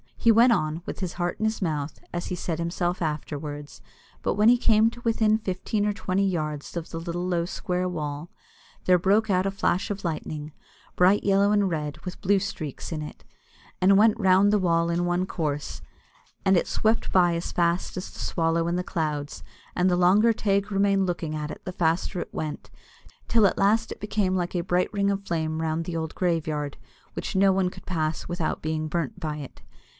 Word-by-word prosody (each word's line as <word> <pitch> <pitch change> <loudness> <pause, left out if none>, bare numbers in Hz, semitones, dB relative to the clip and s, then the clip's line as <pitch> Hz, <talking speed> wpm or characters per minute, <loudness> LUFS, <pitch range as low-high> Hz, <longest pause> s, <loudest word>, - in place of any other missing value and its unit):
He 230 - +5
went 235 +3 +6
on, 160 -3 -1
"with - - -6
his 185 -4 -3
heart 175 +1 -2
in 220 - 0
his 220 -2 -1
mouth," 150 -3 -2
as 175 0 -3
he 180 - -3
said 165 -2 -3
himself 175 +1 -1
afterwards; 150 -1 -5 0.4
but - - 0
when 210 +2 +5
he 245 - +6
came 220 -2 +4
to 240 - -12
within 220 -2 +3
fifteen 205 +1 -2
or 210 - +1
twenty 195 0 0
yards 155 -4 -3
of 170 - -5
the 165 - -5
little 175 +1 -3
low 175 -2 0
square 180 0 -2
wall, 150 -1 -4 0.6
there 180 -1 +5
broke 205 +5 +2
out 185 +1 +2
a - - 0
flash 195 0 0
of 200 -1 -5
lightning, 155 -2 -4 0.4
bright 185 +3 +4
yellow 200 +1 +3
and 205 -2 +3
red, 150 -3 -3
with 180 - -7
blue 200 +2 +3
streaks 175 -8 -5
in 155 -2 -3
it, 150 - -10 0.6
and 195 +1 +5
went 220 +2 +4
round 190 0 +5
about 210 - +4
the 185 -3 0
wall 165 0 +2
in 170 +1 0
one 175 +1 +1
course, 150 -5 -3 0.6
and 190 0 +5
it - - +1
swept 220 +1 0
by 175 -2 +4
as 170 - -3
fast 170 0 0
as 185 - -5
the - - -12
swallow 165 0 0
in 170 - 0
the 180 - -1
clouds, 150 -4 -3 0.3
and 180 +1 +3
the 180 - +2
longer 200 +6 +5
Teig 200 -1 0
remained 195 -1 +2
looking 165 -3 -3
at 150 0 -4
it - - -9
the 185 - -5
faster 175 +1 0
it - - -8
went, 155 -1 -5 0.6
till 225 -3 +4
at - - -2
last 215 +3 +2
it - - -7
became 205 -2 0
like 175 0 -2
a 175 - +1
bright 180 +1 0
ring 200 -1 +1
of 200 0 -2
flame 160 -1 -1
round 160 +1 -1
the 165 -1 -3
old 160 -1 -4
graveyard, 155 -5 -1 0.4
which - - -5
no 195 +1 +5
one 190 -1 +1
could - - -13
pass 155 -3 -2
without 175 -2 -2
being 155 0 -1
burnt 155 -5 -3
by 150 -1 -3
it. 140 -3 -9
180 Hz, 210 wpm, -26 LUFS, 160-195 Hz, 0.6 s, went